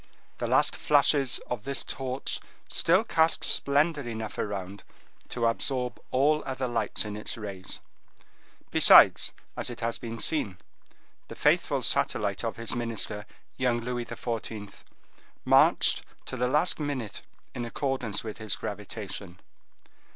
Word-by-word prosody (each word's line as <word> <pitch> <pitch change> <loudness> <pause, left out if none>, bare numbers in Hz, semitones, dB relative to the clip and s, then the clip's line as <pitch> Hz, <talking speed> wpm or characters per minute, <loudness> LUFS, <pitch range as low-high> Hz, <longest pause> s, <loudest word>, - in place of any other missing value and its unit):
The - - -1
last - - +3
flashes 140 -2 +3
of 120 -4 -4
this 140 -1 -2
torch 130 0 -3 0.3
still 185 +6 +3
cast 160 -7 +2
splendor 145 +2 +3
enough 115 -4 -6
around 100 -1 -4 0.5
to 120 -1 -1
absorb 125 +2 0
all 150 +4 +3
other 130 -1 -3
lights 115 -3 -1
in 105 -1 -5
its 105 - -4
rays. 100 -4 -5 0.9
Besides, - - +7 0.2
as - - -3
it 120 - -8
has 115 0 -2
been 115 0 -6
seen, 110 -8 +1 0.7
the - - -9
faithful - - +2
satellite - - +1
of - - -2
his 115 -1 -4
minister, 110 -3 -2 0.3
young 125 -2 +1
Louis 120 0 -3
XIV., 110 -4 -6 0.6
marched - - +5 0.2
to - - -5
the 125 0 0
last 150 +7 +2
minute 140 -8 -3 0.3
in 120 - -4
accordance 120 -3 -2
with 110 -1 -7
his 110 -3 -2
gravitation. 90 +2 -6
120 Hz, 130 wpm, -28 LUFS, 110-135 Hz, 0.9 s, Besides